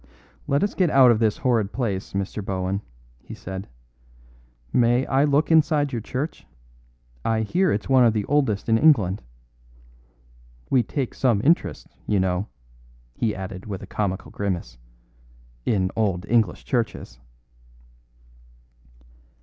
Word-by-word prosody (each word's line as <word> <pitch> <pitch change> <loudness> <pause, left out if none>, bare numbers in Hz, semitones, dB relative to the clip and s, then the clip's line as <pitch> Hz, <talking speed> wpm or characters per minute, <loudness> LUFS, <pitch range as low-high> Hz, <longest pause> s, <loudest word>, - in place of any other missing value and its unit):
"Let 140 +5 +2
us 205 - 0
get 180 -3 +2
out 130 -4 +6
of 110 - +2
this 110 -2 +1
horrid 115 -6 +1
place, 105 -7 -3
Mr. 100 +2 -3
Bohun," 95 0 -2 0.4
he - - -10
said. 95 +1 -7 1.1
"May 120 +2 +3
I 135 +2 +2
look 150 +3 +2
inside 155 -3 +3
your 120 -3 -3
church? 130 +8 -5 0.8
I 110 -1 +1
hear 175 - +1
it's 105 - -2
one 130 -2 +5
of 115 - +5
the 105 -2 -1
oldest 135 -9 0
in 115 0 +3
England. 110 - +4 1.5
We 130 - +5
take 130 +1 -3
some 120 -6 +2
interest, 165 +4 +1 0.2
you 105 - +2
know," 95 +1 0 0.7
he 105 - -1
added 95 +1 -7
with 100 -3 -5
a - - -6
comical 95 -3 -3
grimace, 85 -12 -4 0.9
"in 95 -3 +1
old 100 -4 0
English 110 -6 +1
churches." 115 - -3
110 Hz, 135 wpm, -24 LUFS, 95-135 Hz, 1.5 s, out